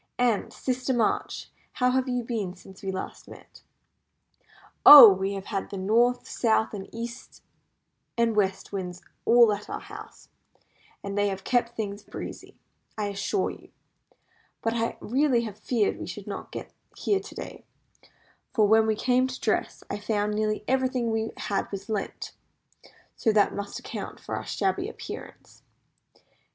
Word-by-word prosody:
"And, 240 -4 +1
Sister 255 0 -2
March, 230 -3 -1 0.2
how 250 -2 +2
have 260 0 +1
you 245 -1 -1
been 215 -6 -3
since 190 +1 -15
we 195 - -3
last 190 - -6
met?" - - -14 1.2
"Oh! 285 -5 +13
we 190 +1 -2
have 195 0 -6
had 195 -3 -3
the 200 - -6
North, 235 +6 +2
South, 220 -2 +1 0.2
East, 235 +1 -8 0.7
and 230 -1 +2
West 195 -2 0
Winds 180 -2 -5 0.2
all 235 -2 +6
at 205 0 -7
our - - -4
house, - - -12 0.7
and 200 0 -4
they 205 0 +2
have 195 -1 -4
kept 240 -1 0
things 205 -2 -4
breezy, - - -9 0.4
I 210 -1 -1
assure 200 - -1
you. - - -14 0.9
But 225 - +1
I 230 0 -1
really 250 -2 +1
feared 210 +1 -1
we - - -6
should - - -7
not - - -7
get - - -7 0.2
here 400 - +1
to - - -11
day; - - -8 0.9
for 215 -4 +4
when 220 +1 +5
we 220 - +2
came 255 +3 +2
to 255 -1 -7
dress - - -1
I - - -4
found 210 0 -1
nearly 215 0 -1
everything 255 -2 +1
we 225 0 -1
had 200 - -2
was 200 +2 -6
lent; 210 -3 -4 0.8
so 225 - +2
that 210 -1 +3
must 205 0 -5
account - - -7
for - - -5
our - - -6
shabby 380 +1 -1
appearance." - - -10
220 Hz, 155 wpm, -27 LUFS, 200-245 Hz, 1.2 s, Oh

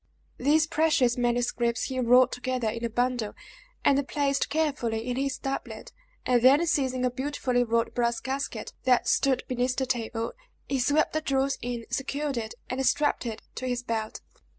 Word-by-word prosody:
These 300 +4 +4
precious 305 -6 +2
manuscripts 240 -1 0
he 260 -1 -2
rolled 250 +1 +5
together 250 -1 -2
in 230 +2 -5
a 235 - 0
bundle, 245 -2 -1 0.5
and 280 -1 +3
placed 280 -2 0
carefully 255 -7 -1
in 245 - -1
his 275 +1 -1
doublet, 270 -1 -5 0.3
and 245 -2 +3
then 275 +7 +6
seizing 260 -5 +1
a 250 - +1
beautifully 255 -1 0
wrought 230 -1 0
brass 235 -1 0
casket, 270 +1 -4
that 250 -2 +3
stood 270 -2 +2
beneath 250 0 0
the 265 - 0
table, 230 -2 -2 0.3
he 270 - -1
swept 290 +5 +2
the 310 - 0
jewels 275 -2 0
in, 240 -1 -4
secured 275 +2 -2
it, 220 -2 -4
and 260 +1 -2
strapped 290 -2 +1
it 220 -1 -6
to 255 - -4
his 245 -1 -2
belt. 220 -2 -3
255 Hz, 170 wpm, -27 LUFS, 240-275 Hz, 0.5 s, then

